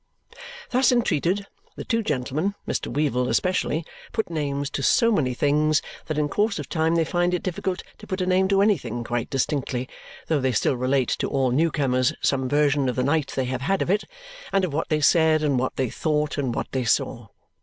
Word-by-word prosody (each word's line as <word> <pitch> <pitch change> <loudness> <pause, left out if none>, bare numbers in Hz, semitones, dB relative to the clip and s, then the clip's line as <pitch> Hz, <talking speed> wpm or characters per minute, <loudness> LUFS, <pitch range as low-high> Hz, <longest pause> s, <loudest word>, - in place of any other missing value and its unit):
Thus 255 +1 +4
entreated, 200 - +1 0.3
the - - -6
two 230 0 +1
gentlemen 150 - -1
(Mr. - - -2
Weevle 130 -4 0
especially) 180 -3 0 0.3
put 220 -6 -2
names 145 -2 -2
to 140 - -3
so 230 - +4
many 130 - +1
things 150 +3 +2 0.2
that 155 - -2
in 150 -1 +1
course 210 +6 0
of - - -5
time 160 0 +1
they 165 -1 +2
find 175 +2 +1
it 180 - -4
difficult 185 0 -3 0.2
to 210 - -12
put 185 -1 -3
a 185 - 0
name 185 +1 +3
to 195 0 +3
anything 125 - 0
quite 120 0 -3
distinctly, 130 -2 -1 0.4
though 155 -3 +1
they 130 -1 +1
still 125 - +1
relate 130 +1 +1
to - - 0
all 135 -3 +1
new 160 +6 +3
comers 130 -4 +1
some 130 -2 0
version 145 -2 +2
of 125 - -2
the 125 - 0
night 145 +1 0
they 130 - 0
have 130 0 -3
had 195 +8 +1
of - - -1
it, 205 +2 +1 0.5
and 195 -1 +2
of 165 - -5
what 160 - -2
they 155 -1 +1
said, 160 0 +4
and 140 -4 +2
what 130 - -2
they 130 -3 -1
thought, 150 -1 -1
and 130 -4 -1
what - - -4
they 130 -1 -1
saw. 115 - 0
150 Hz, 210 wpm, -24 LUFS, 130-180 Hz, 0.5 s, Thus